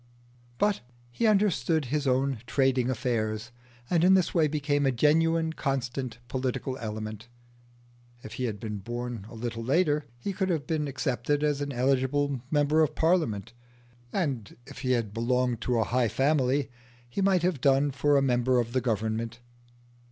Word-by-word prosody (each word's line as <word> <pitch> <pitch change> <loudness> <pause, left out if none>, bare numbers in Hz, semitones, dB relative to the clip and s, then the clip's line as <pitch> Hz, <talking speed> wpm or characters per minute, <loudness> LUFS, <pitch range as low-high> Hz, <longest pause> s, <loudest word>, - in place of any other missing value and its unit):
But 205 +5 +1 0.3
he 225 - +1
understood 195 -7 +2
his 145 +3 -1
own 130 -1 +1
trading 130 -1 +2
affairs, 115 -3 -2 0.4
and 170 +2 +2
in 190 +1 +6
this 185 -2 +2
way 160 -3 +4
became 145 -1 0
a - - +3
genuine, 160 +5 +2
constant 130 -5 -3
political 130 +1 -2
element. 110 0 -5 1.0
If 110 - -8
he 125 +3 -2
had 105 -4 -3
been 105 -1 -5
born 120 0 -5
a 120 - -11
little 115 0 -4
later 150 +3 +2
he 195 +11 -4
could 190 0 -1
have 160 -5 -1
been 155 -2 -1
accepted 135 +1 -1
as 145 -1 +1
an 145 0 -2
eligible 135 +1 +1
member 150 +1 +3
of 155 - +1
Parliament, 155 - +1 0.6
and 135 - -2
if - - -11
he 130 -1 +1
had 115 -4 -1
belonged 120 0 0
to 125 0 0
a 115 - +3
high 120 +2 +1
family 135 +2 +1 0.4
he 120 +11 -3
might 190 -3 +3
have 175 -7 0
done 140 +1 +3
for 145 +1 +2
a 135 - +3
member 125 -1 +2
of 120 0 -2
the 130 - +1
Government. 115 0 -2
130 Hz, 165 wpm, -28 LUFS, 120-150 Hz, 1.0 s, in